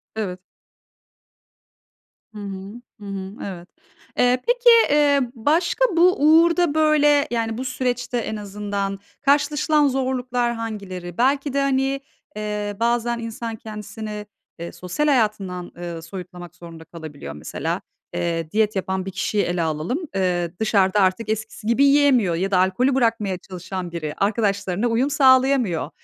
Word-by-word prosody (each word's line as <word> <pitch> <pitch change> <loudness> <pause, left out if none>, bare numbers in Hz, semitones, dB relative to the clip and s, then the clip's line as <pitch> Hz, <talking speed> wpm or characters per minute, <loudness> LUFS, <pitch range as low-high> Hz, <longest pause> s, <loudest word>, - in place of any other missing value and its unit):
Evet. 185 -4 -3 2.0
Hı - - -7
hı. 200 +3 -7 0.2
Hı - - -9
hı. 195 0 -6
Evet. 180 -3 -7 0.5
Eee, 250 0 +3
peki, 485 0 +4 0.2
eee, 290 -1 +4
başka 335 - +2
bu 365 +2 +6
uğurda 330 +1 +5
böyle, 300 -2 +4
yani 225 -1 -1
bu 260 - -4
süreçte 250 -1 -2
en 220 -2 -3
azından 200 -1 -4 0.2
karşılaşılan 295 +1 +3
zorluklar 255 -2 -1
hangileri? 195 -6 -6
Belki 275 +2 +1
de 280 - +1
hani, 270 0 0 0.3
eee, 210 -1 -3
bazen 235 0 +1
insan 230 0 -5
kendisini, 210 -1 -7 0.3
eee, 170 - -6
sosyal 185 +12 -2
hayatından, 210 -9 0
ııı, 170 -2 -6
soyutlamak 175 0 -9
zorunda 165 -2 -11
kalabiliyor 155 - -9
mesela. 75 - -4 0.3
Eee, 165 -2 -2
diyet 215 -1 +1
yapan 190 0 -2
bir 195 - -5
kişiyi 200 +2 0
ele 175 0 -1
alalım. 160 - -1 0.2
Eee, 175 -2 0
dışarıda 205 -2 +2
artık 195 +3 +1
eskisi 220 0 -4
gibi 235 +4 +3
yiyemiyor 275 -11 +4
ya 190 +3 -1
da 185 - +3
alkolü 215 +9 +2
bırakmaya 225 -6 +1
çalışan 185 -1 -7
biri, 155 -3 -4
arkadaşlarına 200 0 0
uyum 240 +5 +1
sağlayamıyor. 260 - +3
215 Hz, 135 wpm, -22 LUFS, 185-260 Hz, 2.0 s, bu